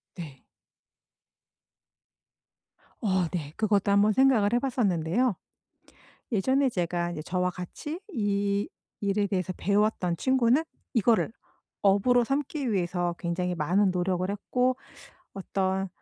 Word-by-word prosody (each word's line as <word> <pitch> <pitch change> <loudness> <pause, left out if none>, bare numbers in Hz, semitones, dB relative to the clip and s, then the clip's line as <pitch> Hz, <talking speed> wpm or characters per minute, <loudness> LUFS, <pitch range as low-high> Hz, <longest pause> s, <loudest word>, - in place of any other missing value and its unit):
네. 155 -7 -9 2.6
어, 190 -4 +2
네. 155 -5 -4
그것도 205 -2 +2
한번 205 +1 +4
생각을 235 -4 +4
해 240 - +4
봤었는데요. 230 -3 +1 1.0
예전에 265 +6 +2
제가 175 -3 -1
이제 155 -2 -5
저와 180 +2 -1
같이 180 - -7
이 200 - 0 0.3
일에 200 0 +1
대해서 185 -2 -1
배웠던 200 -3 +1
친구는 260 - +2 0.3
이거를 230 -1 +2 0.5
업으로 205 +5 +4
삼기 275 -1 -2
위해서 175 -2 -1
굉장히 180 +1 -2
많은 180 +5 +2
노력을 180 0 -1
했고 250 +5 0 0.6
어떤 190 0 -2
200 Hz, 235 characters per minute, -27 LUFS, 180-235 Hz, 2.6 s, 한번